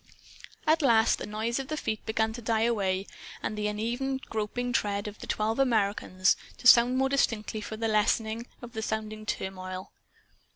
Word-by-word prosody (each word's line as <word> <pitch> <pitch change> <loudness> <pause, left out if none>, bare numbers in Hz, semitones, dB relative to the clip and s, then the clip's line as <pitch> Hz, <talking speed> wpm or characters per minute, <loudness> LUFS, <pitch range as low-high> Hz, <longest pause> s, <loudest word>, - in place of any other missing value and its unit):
At 320 +1 +4
last 230 -5 +4
the - - -5
noise 220 +4 -2
of 270 - -5
feet 215 -1 -3
began 220 0 +1
to 240 - -7
die 225 -1 +1
away, 195 -5 +1 0.4
and - - -2
the 210 0 -1
uneven 240 +6 -1
groping 245 0 -3
tread 205 -2 0
of 210 0 -8
the - - -8
twelve 220 +3 0
Americans 200 -6 +2 0.2
to - - -14
sound 245 +1 +7
more 265 0 +3
distinctly 225 -5 0
for 220 +1 -6
the 225 0 -1
lessening 220 +2 +1 0.2
of 240 - -8
the 220 - -3
surrounding 215 -1 -4
turmoil. 185 -1 -4
220 Hz, 170 wpm, -28 LUFS, 210-240 Hz, 0.4 s, sound